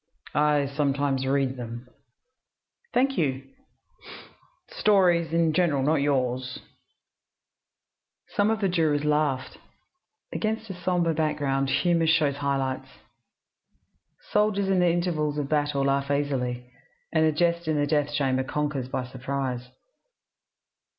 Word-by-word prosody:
"I 150 -1 +3
sometimes 140 -1 0
read 135 -1 0
them." 120 0 -7 1.0
"Thank 270 +2 +1
you." 135 -4 0 1.3
"Stories 180 - +3
in 165 -1 +2
general 155 -5 +2
not 150 +1 +2
yours." 130 -2 0 1.7
Some 205 +1 +1
of 220 -1 0
the 195 - +2
jurors 155 -5 +1
laughed. 150 -3 0 0.7
Against 220 -1 -2
a - - -4
sombre 175 -2 0
background 145 -3 0
humor 165 +4 +2
shows 150 -3 +2
high 140 -1 0
lights. 130 0 -3 1.4
Soldiers 205 -2 +2
in 190 -1 +3
the 180 -1 +4
intervals 165 -4 0
of 145 -2 -2
battle 145 -2 +1
laugh 140 0 0
easily, 125 -4 -2 0.4
and 160 -1 +3
a 160 - +4
jest 170 +1 0
in 155 - +1
the 145 - +2
death 145 0 0
chamber 135 -3 +1
conquers 145 -1 -2
by 130 - -2
surprise. 130 -1 -4
145 Hz, 120 wpm, -26 LUFS, 135-170 Hz, 1.7 s, the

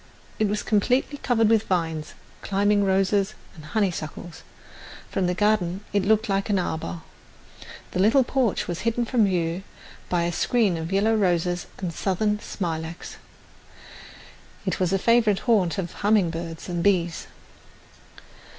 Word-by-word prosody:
It 215 - +3
was 210 +1 -2
completely 250 +7 +1
covered 225 -3 +2
with 220 -1 +3
vines, 165 -4 -2 0.3
climbing 205 +1 +2
roses 195 +1 +1 0.2
and 155 - -12
honeysuckles. 175 -3 -3 0.7
From 185 - 0
the 180 - 0
garden 200 -3 +1
it 200 -2 +2
looked 220 +3 +2
like 195 +1 0
an 205 - +2
arbour. 160 - -3 0.9
The - - -3
little 225 +8 +5
porch 250 -3 0
was 175 -1 -3
hidden 230 +2 0
from 230 -2 +2
view 175 -2 -1 0.5
by 175 -1 +1
a 170 - 0
screen 210 +2 +1
of 165 +1 -5
yellow 205 +3 +2
roses 180 -3 0
and 180 -3 -4
Southern 210 +4 0
smilax. 165 -4 -5 1.5
It - - -1
was 185 -2 +1
the 195 - +2
favourite 220 -1 +3
haunt 205 -8 +2
of 175 -3 -3
humming 205 -4 +2
birds 165 0 -6
and 175 -2 -2
bees. 175 -4 +1
195 Hz, 140 wpm, -24 LUFS, 175-215 Hz, 1.5 s, little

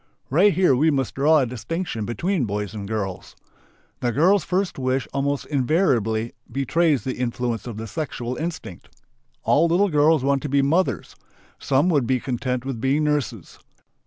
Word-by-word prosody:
Right 185 +9 +5
here 180 -8 +3
we 155 +6 +3
must 135 -4 -1
draw 150 +4 +4
a 140 - +3
distinction 120 - -4
between 160 - -1
boys 105 0 -3
and 100 -2 -6
girls. 100 -4 -4 0.6
The 120 - 0
girl's 180 - +3
first 185 -4 -1
wish 130 0 -1
almost 140 0 -1
invariably 125 - +1 0.2
betrays 140 +1 +1
the 130 - -4
influence 120 -2 -2
of 115 -3 -6
the 110 - -5
sexual 125 0 -4
instinct. 155 - -6 0.5
All 165 +3 +3
little 185 +5 +2
girls 150 -2 +3
want 140 0 +1
to 150 - -4
be 140 0 +2
"mothers"; 165 +7 0 0.4
some 140 +5 +2
would 145 -8 +2
be 130 -1 +1
content 125 0 -3
with 130 -5 -4
being 140 +4 +1
"nurses." 130 - -2
135 Hz, 160 wpm, -23 LUFS, 120-155 Hz, 0.6 s, Right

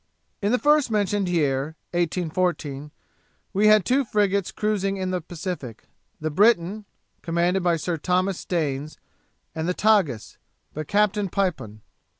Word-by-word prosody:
In 205 +1 +1
the 250 - +3
first 295 -1 +3
mentioned 205 -3 0
year 150 -3 0 0.2
(1814) 170 -4 -1 0.6
we 210 +2 +3
had 215 -3 +5
two 270 +2 +2
frigates 200 -4 0
cruising 195 -2 -1
in 185 -1 -2
the 180 -1 -1
Pacific, 160 - -6 0.4
the 155 0 -3
Briton, 205 +2 +2 0.4
commanded 175 +3 +1
by 175 -1 +2
Sir 165 +1 -2
Thomas 185 +3 0
Staines, 150 -4 -3 0.6
and 160 +1 -2
the 180 - 0
Tagus, 190 - +1 0.4
by 155 +1 -5
Captain 205 +2 +1
Pipon. 165 - -2
180 Hz, 135 wpm, -24 LUFS, 160-205 Hz, 0.6 s, had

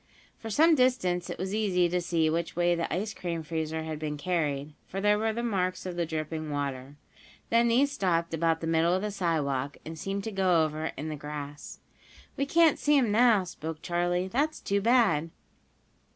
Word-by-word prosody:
For 225 - -7
some 320 +9 +5
distance 245 - +1
it - - -5
was 190 +2 -4
easy 190 -5 +2
to 180 +1 -1
see 170 -2 +1
which 165 +2 -1
way 175 0 +2
the 170 -1 -2
ice 205 +6 -2
cream 170 -4 -4
freezer 160 0 -3
had 155 -1 -5
been 150 -1 -3
carried, 150 -3 -2
for 195 - -5
there 210 +1 +3
were 220 0 +1
the 235 +2 -3
marks 185 -6 -1
of 180 -1 -4
the 170 -1 -1
dripping 155 0 -4
water. 140 -1 -4 0.6
Then 235 +1 +4
these 265 +5 +3
stopped 170 -9 0
about 165 0 +1
the - - -3
middle 165 +2 +2
of 190 - -2
the 210 - -2
sidewalk, 145 -8 -1
and 160 0 -7
seemed 195 +4 -3
to 220 - -4
go 185 -4 +3
over 155 +1 -4
in 150 +3 -4
the 155 - -4
grass. 145 0 -8 0.5
"We 275 - -1
can't 330 0 +4
see 295 0 +3
'em 240 -6 +2
now," 225 -2 +5
spoke 160 -3 -7
Charley. 175 +1 0
"That's 290 +9 -1
too 200 0 0
bad." 210 -9 +3
175 Hz, 195 wpm, -28 LUFS, 160-210 Hz, 0.6 s, some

